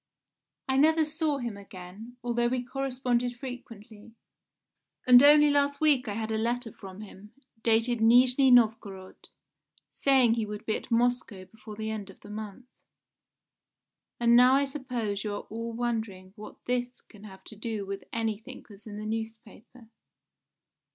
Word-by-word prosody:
I 265 0 0
never 315 +2 +4
saw 310 -1 -1
him 240 -5 -5
again, 200 +4 -12
although 240 0 0
we 250 0 -2
corresponded 250 -2 -2
frequently, 230 -4 -11 0.9
and 250 -1 +8
only 295 +1 +6
last 285 0 +1
week 290 -6 +2
I 205 - -3
had 220 0 -4
a 220 - -1
letter 235 +1 -2
from 190 0 -11
him, 210 0 -13 0.3
dated 230 +1 +1
Nijni 250 +4 +5
Novgorod, 215 -5 +1 0.6
saying 260 -4 +3
he 225 -2 -1
would 210 0 -7
be 220 - 0
at - - -7
Moscow 235 -5 0
before 215 +1 -12
the 220 +1 -4
end 205 -2 -6
of 195 - -16
the 205 - -12
month. 215 +3 -8 1.5
"And 235 0 +4
now 250 +2 +6
I 280 +1 +2
suppose 245 -8 -4
you 210 -1 -3
are - - -5
all 230 +1 -5
wondering 220 -6 -4
what 210 -1 -13
this 245 0 -3
can 210 -1 -17
have 190 -2 -13
to 215 - -12
do 215 -1 -5
with 195 0 -6
anything 225 +3 -4
that's 205 0 -16
in 210 -1 -8
the 215 - -6
newspaper. 225 +1 -8
230 Hz, 155 wpm, -28 LUFS, 210-250 Hz, 1.5 s, and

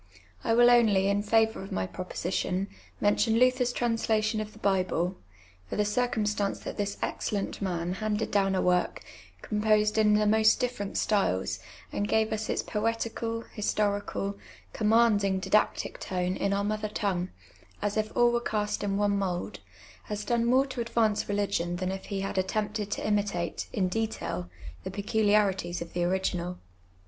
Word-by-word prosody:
I 225 - +2
will 240 +1 +7
only, 210 -5 +4
in 200 0 +2
favour 220 +1 +2
of 195 - -9
my 95 - -1
proposi 180 - -5
tion, 190 +2 -1 0.3
mention 220 +2 +3
Luther's 250 0 +3
translation 225 -2 0
of 215 0 -6
the - - -16
Bible; 185 -3 0 0.5
for - - -4
the 210 - +1
cir 245 +4 +1
cumstance 210 -3 -1
that - - -5
this 200 0 -2
excellent 200 -1 -2
man 175 -2 -1
handed 215 +2 -2
down 195 -1 +2
a 185 - +1
work, 180 -1 +1 0.4
com 210 0 -2
posed 215 0 +3
in 210 -1 +5
the 210 0 +3
most 220 +1 +4
different 245 -6 -2
styles, 195 - +1 0.3
and 205 - -1
gave 220 +1 +2
us 215 0 -3
its - - 0
poetical, 230 +1 -2
historical, 205 -1 -1 0.3
commanding 210 -3 +3
didactic 210 +3 +1
tone 180 0 -2
in 200 - 0
our 200 0 +1
mother 215 +1 -2
tongue, 190 -4 -1 0.5
as 205 0 -1
if 215 0 -1
all 240 0 +5
were 240 0 +1
cast 210 -3 -1
in 200 -1 0
one 205 0 +2
mould, 180 -3 -3 0.5
has 210 0 -4
done 235 -1 +1
more 260 +3 +4
to 260 -3 -4
advance 230 -3 +1
religion 200 -4 0
than 185 +1 -2
if 190 0 -6
he 195 -1 -3
had 195 0 -1
attempted 210 +2 -2
to - - -3
imitate, 200 -5 -1
in 190 -3 +1
detail, 185 - -3 0.3
the - - -4
peculiarities 205 -4 +1
of 170 -1 -7
the 175 - 0
original. 180 -1 -1
210 Hz, 165 wpm, -28 LUFS, 190-220 Hz, 0.5 s, will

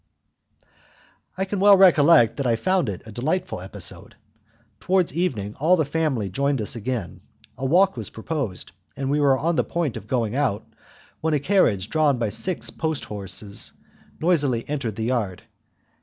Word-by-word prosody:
I 190 - 0
can 195 0 -3
well 200 0 +7
recollect 160 - +6
that 140 -3 -1
I 115 - +3
found 185 - +1
it 95 - -6
a 110 - -10
delightful 155 - -2
episode. 95 0 -8 0.6
Towards 185 - +1
evening 120 - -2
all 165 +6 +4
the 160 - +1
family 145 -8 -1
joined 140 +8 0
us 105 - -3
again, 115 -3 -4 0.3
a 135 - -3
walk 190 +7 +4
was 110 -4 -3
proposed, 115 - -4 0.3
and 135 0 -2
we 150 - +2
were 140 -2 +4
on 165 +3 0
the - - +3
point 165 -9 -2
of 105 -2 -10
going 120 -2 -1
out, 130 -8 0 0.5
when 160 -1 0
a - - +1
carriage 140 - +2
drawn 150 -4 +2
by 115 -3 -1
six 180 - -2
post 160 -2 -3
horses 100 0 -4 0.5
noisily 145 -9 +1
entered 135 -8 -3
the 110 - -3
yard. 110 -7 -2
135 Hz, 165 wpm, -23 LUFS, 110-165 Hz, 0.6 s, well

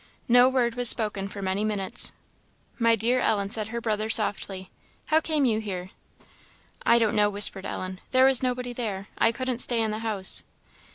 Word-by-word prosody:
No 245 +1 +5
word 245 -3 0
was 245 -1 0
spoken 210 -4 +4
for 200 0 -8
many 190 +2 -2
minutes. 205 -3 -1 0.7
"My 230 -1 +3
dear, 235 +4 0
Ellen," 200 -4 0
said 215 -2 -1
her 235 +1 -5
brother, 215 -1 -2
softly, 195 -4 0 0.3
"how 310 +1 +2
came 305 -3 0
you 220 -3 +1
here?" 190 -3 -6 0.9
"I 235 - +4
don't 225 -3 +1
know," 210 -1 +3
whispered 200 -1 +3
Ellen; 185 0 -6
"there 260 0 +4
was 265 -2 +3
nobody 250 -1 -3
there 210 -5 -5
I 230 - +3
couldn't 250 +1 -4
stay 240 -2 +2
in 220 -1 -1
the 215 - -4
house." 215 -4 0
220 Hz, 180 wpm, -25 LUFS, 200-245 Hz, 0.9 s, No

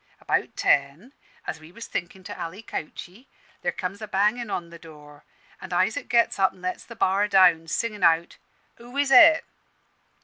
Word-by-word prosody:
About - - -2
ten, 145 - 0 0.3
as 160 - -5
we 155 +1 -15
was 230 +5 -9
thinkin' 180 +2 -6
to - - -8
alley 185 +6 -7
couchey, 195 - -8 0.3
there - - -1
comes 195 +3 -6
a 215 - -6
bangin' 210 +4 0
on 170 -3 -4
the 170 - -12
door, 150 -3 -15 0.4
an' 190 - -9
Isaac 215 +10 0
gets 235 -3 +2
up 190 -1 +3
an' 185 - -20
lets 185 - -4
the 235 - -12
bar 200 -1 +1
down, 180 -5 +4
singin' 210 +4 -3
out, 165 0 +2 0.4
'Who 240 +3 -11
is 285 -1 +1
it?' 320 +5 +7
190 Hz, 175 wpm, -24 LUFS, 170-230 Hz, 0.4 s, it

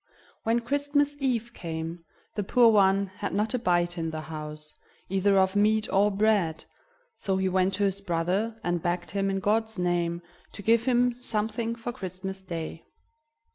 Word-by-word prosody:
When 230 +1 +1
Christmas 285 +3 +1
Eve 240 -4 -1
came, 165 0 -5 0.3
the 205 - -2
poor 235 +4 +5
one 195 -1 +4
had 190 0 -5
not 210 +3 0
a 250 - +1
bite 175 -4 +1
in 165 0 -1
the 155 -1 -4
house, 150 -1 -7 0.4
either 195 +1 +3
of 190 0 +3
meat 215 +1 +3
or 200 +2 +5
bread; 200 -5 +1 0.5
so 190 -1 -1
he 190 0 +1
went 185 +1 +2
to 205 - 0
his 200 0 0
brother, 195 +5 -1
and 175 -1 0
begged 175 +1 -2
him, 195 0 0
in 195 0 0
God's 220 +2 0
name, 175 -1 0 0.3
to 205 - -8
give 230 +2 +3
him 245 -1 +2
something 225 0 -2
for 235 +1 -5
Christmas 190 -3 -6
Day. 165 -3 -6
195 Hz, 170 wpm, -27 LUFS, 175-225 Hz, 0.5 s, poor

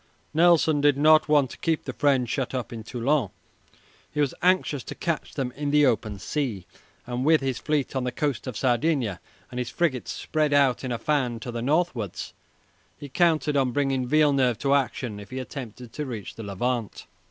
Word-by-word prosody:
Nelson 160 -2 +4
did 145 -1 +4
not 155 +1 +5
want 145 -4 +3
to - - -11
keep 165 -2 -1
the - - -4
French 135 -4 +2
shut 130 +2 -2
up 125 -2 -4
in 115 -1 -7
Toulon. 125 0 0 0.8
He 150 - -4
was 145 -3 +2
anxious 180 -7 +2
to - - -7
catch 170 -3 -3
them 130 -3 -2
in 145 +2 -4
the 150 0 +5
open 110 -5 0
sea, 110 - -3 0.4
and 125 +1 -3
with 155 +1 +4
his 135 -2 -2
fleet 150 -3 -1
on 130 - 0
the 125 - -1
coast 140 -1 -2
of 125 -5 -4
Sardinia 125 - +1 0.3
and 125 - -4
his 125 - -2
frigates 145 -8 -1
spread 155 -2 -1
out 140 -3 +3
in 130 - -3
a 120 - -1
fan 125 -4 0
to 120 - -5
the 120 0 -4
northwards 135 - -1 0.6
he 145 - -9
counted 155 0 +2
on 130 -3 +2
bringing 135 -2 0
Villeneuve 140 -5 +3
to 140 +4 +1
action 125 -5 -1
if 100 - -11
he 130 - -6
attempted 125 -3 -7
to 150 - -4
reach 115 -6 -6
the - - -9
Levant. 110 +3 -3
135 Hz, 195 wpm, -25 LUFS, 120-150 Hz, 0.8 s, not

